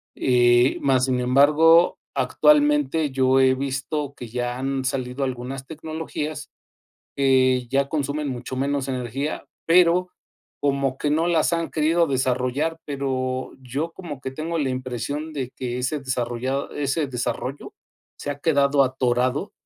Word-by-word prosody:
Eh, 120 0 +3
más 130 -2 +3
sin 130 -1 0
embargo, 150 +7 +5 0.2
actualmente 150 +2 +3
yo 130 0 +3
he 130 0 +4
visto 140 +2 -3
que 120 - -8
ya 120 +1 -3
han 135 0 -2
salido 130 +1 -2
algunas 130 +1 -5
tecnologías 155 -1 -5 0.7
que 130 -2 +3
ya 135 +2 +1
consumen 145 0 -2
mucho 130 0 -5
menos 140 0 -1
energía, 130 +3 -3 0.2
pero 180 +1 +4 0.5
como 140 -2 0
que 145 - -1
no 160 +3 +2
las 170 -1 +2
han 165 -1 -1
querido 165 +2 +2
desarrollar. 130 +3 0
Pero 130 -2 -2
yo 135 +6 -3
como 160 -6 -8
que 130 - -5
tengo 160 +5 -3
la 140 -4 0
impresión 130 +5 -4
de 135 -4 -4
que 125 -1 -5
ese 135 +4 -1
desarrollado 130 0 -2
ese 145 +2 -1
desarrollo 130 +2 -4 0.4
se 145 - -4
ha 140 - -5
quedado 140 -2 +3
atorado, 130 +6 0
135 Hz, 135 wpm, -23 LUFS, 130-150 Hz, 0.7 s, embargo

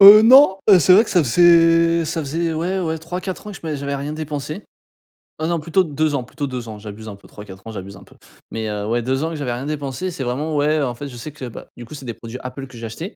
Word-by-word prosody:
Heu 205 +2 +11
non, 250 -3 +7
heu, 190 -3 +8
c'est 180 - +5
vrai 215 +5 +6
que - - -8
ça 180 - +4
faisait 165 +3 +5
ça 160 +1 -2
faisait 165 +3 -2
ouais 180 +4 -1
ouais 160 -2 -2
3-4 180 +5 -6
ans - - -6
que 195 - -9
je - - -9
m'ai 155 -2 -2
j'avais 140 0 -4
rien 145 +2 -4
dépensé. 155 +3 -5 0.8
Heu, 160 - 0
non 170 -1 0
plutôt 170 +5 +1
2 155 -2 -1
ans, 130 - -2
plutôt 145 +4 -5
2 125 -3 -6
ans. 105 -1 -8
J'abuse 105 +1 -9
un 100 - -8
peu, - - -19
3-4 100 -2 -12
ans - - -6
j'abuse 100 -1 -8
un - - -14
peu. - - -20 0.4
Mais 110 -1 -3
heu, 105 0 -4
ouais 120 +1 0
2 130 +4 -1
ans 165 - -1
que - - -5
j'avais 140 -5 -3
rien 125 +3 -5
dépensé, 150 +4 -4
c'est 140 -5 -5
vraiment 145 +6 -2
ouais 150 +1 +2
en 125 -3 -2
fait, 145 +3 -7
je 125 - -10
sais 150 +6 -7
que 135 -3 -8
bah, 120 - -9
du 120 - -9
coup, 155 - -12
c'est 140 -3 -9
des 120 - -4
produits 115 +2 -9
Apple 130 +1 -7
que 130 - -14
j'ai 115 - -7
achetés. 160 - -7
150 Hz, 285 wpm, -20 LUFS, 125-165 Hz, 0.8 s, Heu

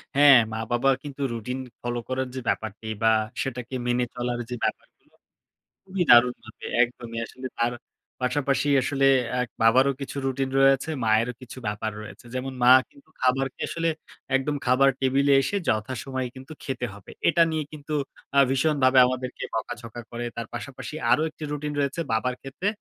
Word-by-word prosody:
হ্যাঁ, 140 -2 +8 0.2
মা-বাবা 120 +4 0
কিন্তু 140 -1 -8
রুটিন 125 +3 -4 0.2
ফলো 120 0 -2
করার 130 0 -1
যে 130 - -2
ব্যাপারটি 110 0 -3 0.2
বা, 110 - +6 0.3
সেটাকে 125 -1 -4
মেনে 120 0 +2
চলার 120 0 -2
যে 125 - -3
ব্যাপারগুলো, - - -5 0.7
খুবই 190 -2 -1
দারুণভাবে 120 -2 +4 0.2
একদমই। 120 -1 -5
আসলে 130 +2 -8
তার 120 +1 +1 0.5
পাশাপাশি 140 +2 +1
আসলে 135 +1 +1 0.4
এক 125 - -3
বাবারও 130 +5 +5
কিছু 140 - -5
রুটিন 135 0 -1
রয়েছে, 135 +2 +4 0.2
মায়েরও 110 +3 +2
কিছু 130 0 -10
ব্যাপার 105 +1 -2
রয়েছে। 105 - -11
যেমন 130 +1 -3
মা 125 - +8 0.2
কিন্তু 280 -1 -22
খাবারকে 130 +1 +1
আসলে 165 0 -1 0.5
একদম 135 +2 0
খাবার 130 +2 +5
টেবিলে 135 +2 +3
এসে 200 - -2
যথাসময়ে 130 +3 -2
কিন্তু 130 +4 -10
খেতে 130 -2 -3
হবে। 100 - -13 0.2
এটা 170 0 +5
নিয়ে 155 -1 -1
কিন্তু 150 0 -7 0.4
আ - - +8
ভীষণভাবে 135 -1 +3
আমাদেরকে 130 0 -4
বকাঝকা 120 0 -5
করে। 120 +1 -4
তার 115 -1 -5
পাশাপাশি 135 +5 -7 0.2
আরও 140 +6 +4
একটি 155 0 -11
রুটিন 150 0 -3
রয়েছে 140 +4 0
বাবার 125 +3 0
ক্ষেত্রে। 135 +8 -4
130 Hz, 155 wpm, -25 LUFS, 120-140 Hz, 0.7 s, হ্যাঁ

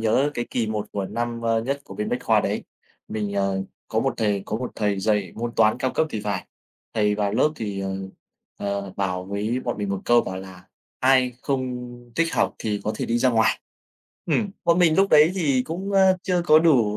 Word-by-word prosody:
nhớ 120 +6 +2
cái 120 - -2
kỳ 115 -3 0
1 105 -1 -2
của 100 -1 -2
năm, 120 +2 -3
ơ, 115 -1 +2
nhất 140 +3 -2
của 95 - -10
bên 105 +2 -3
Bách - - 0
Khoa - - +4
đấy, - - -2 0.4
mình, 105 -2 -3
ờ, 100 -1 0 0.3
có - - 0
một - - 0
thầy 105 -3 0
có 105 - -2
một 125 +2 -4
thầy 105 -2 0
dạy 105 -3 0
môn 120 +1 -3
Toán 110 -1 +4
cao 130 - 0
cấp 160 - +2
thì 110 - -3
phải, 100 -3 -3 0.5
thầy 105 -1 +2
vào 105 -1 0
lớp 130 - +3
thì, 100 -5 -4
ờ, 95 - -3 0.7
ờ, 100 -1 -3
bảo 90 -2 -1
với 105 +6 -2
bọn 120 - -2
mình 100 - -2
một 100 -1 -2
câu 120 0 +5
bảo 95 - -5
là 95 -1 -9 0.4
"Ai 130 -1 +4
không 130 -3 -2 0.4
thích 165 0 +1
học - - +1
thì 105 -2 -2
có 110 - 0
thể - - -3
đi 115 - +1
ra 130 - +3
ngoài". 115 -1 +3 0.7
Ừm, 210 -3 +1
bọn 170 +1 +4
mình 165 -3 +4
lúc 195 0 +4
đấy 155 +3 +6
thì 140 -9 +2
cũng, 185 +7 -5
ơ, 190 -1 +5
chưa 180 -2 +1
có 155 - +8
đủ, 125 -11 +3
115 Hz, 225 wpm, -24 LUFS, 100-135 Hz, 0.7 s, có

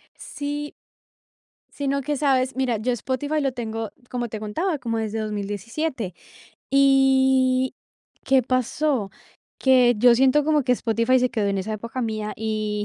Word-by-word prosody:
Sí. 290 0 -5 1.0
Sino 280 -1 -1
que, 295 +1 -2
¿sabes? 265 -2 +1
Mira, 255 -4 0
yo 245 +4 -1
Spotify 270 +6 -2
lo 270 -1 0
tengo, 225 -2 -4 0.2
como 240 -1 -3
te 215 -1 -6
contaba, 295 - -2
como 230 -2 -2
desde 220 0 -2
2017. 215 - -3 0.6
Y, 265 -1 +3 0.5
¿qué 265 -1 +4
pasó? 255 -2 0 0.5
Que 250 -2 +5
yo 240 +1 +6
siento 270 +3 +3
como 305 -2 +2
que 250 0 +2
Spotify 230 +2 +2
se 250 0 +1
quedó 210 -3 -1
en 195 -1 -1
esa 215 +3 -3
época 230 +4 -5
mía 215 -1 -3
y, 215 -1 -2
250 Hz, 145 wpm, -23 LUFS, 220-270 Hz, 1.0 s, yo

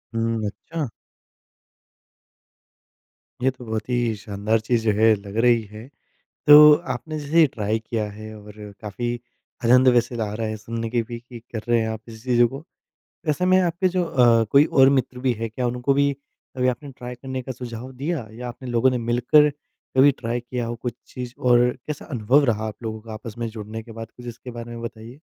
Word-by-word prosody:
हुँ, 115 -1 0
अच्छा? 150 +7 -5 2.5
ये 130 - +4
तो 125 -1 -12
बहुत 110 +1 -4
ही 120 -2 +1
शानदार 105 +1 -1
चीज़ 115 +1 0
जो 110 - +3
है, 110 +2 +5
लग 100 0 -10
रही 120 -2 +5
है। 105 +3 -11 0.6
तो 150 0 +10 0.2
आपने 155 -1 -6
जैसे 150 +3 +1
ये 160 - +7
ट्राय 110 -4 -2
किया 110 -1 -3
है 110 +1 -9
और 105 0 -12 0.3
काफ़ी 115 +3 -3 0.5
आनंद 125 +2 +6
वैसे 120 +1 +1
आ 105 -1 -4
रहा 110 +1 -2
है 110 - -3
सुनने 115 +2 -5
कि 120 0 +1
भी 120 -1 -5
कि 120 0 -12
कर 115 -1 -7
रहे 120 -1 +4
हैं 110 - -1
आप 110 -1 -5
इस 110 0 -11
चीज़ों 120 -2 +4
को। 135 +5 -8 0.7
ऐसे 155 +4 +1
में 185 0 +5
आपके 180 +1 +1
जो 180 0 0
अ, 120 -7 +4
कोई 140 +1 +7
और 135 -4 +5
मित्र 130 -2 0
भी 125 0 +1
हैं, 115 0 -4
क्या 125 +3 -2
उनको 125 +3 0
भी 140 0 +3 0.4
कभी 130 0 +2
आपने 140 +3 -3
ट्राय 125 -1 -8
करने 130 +1 -6
का 130 - -5
सुझाव 120 0 -7
दिया? 140 0 -3
या 120 +2 -7
आपने 125 +1 -8
लोगों 120 +2 +3
ने 125 - -1
मिलकर 120 +6 +4 0.5
कभी 135 +2 +7
ट्राई 120 0 -2
किया 120 0 -4
हो 120 - -3
कुछ 120 +1 -4
चीज़ 125 -1 -7
और 120 -1 +4 0.2
कैसा 150 -1 -5
अनुभव 130 +3 +3
रहा 110 -4 0
आप 110 +2 -10
लोगों 110 -1 -4
का 110 0 -10
आपस 110 0 -8
में 115 -1 -2
जुड़ने 110 0 -7
के 115 0 -12
बाद? 115 0 -8
कुछ 125 - -11
इसके 120 +1 -8
बारे 120 0 -8
में 115 0 -7
बताइए। 115 +3 -8
120 Hz, 205 wpm, -23 LUFS, 110-130 Hz, 2.5 s, तो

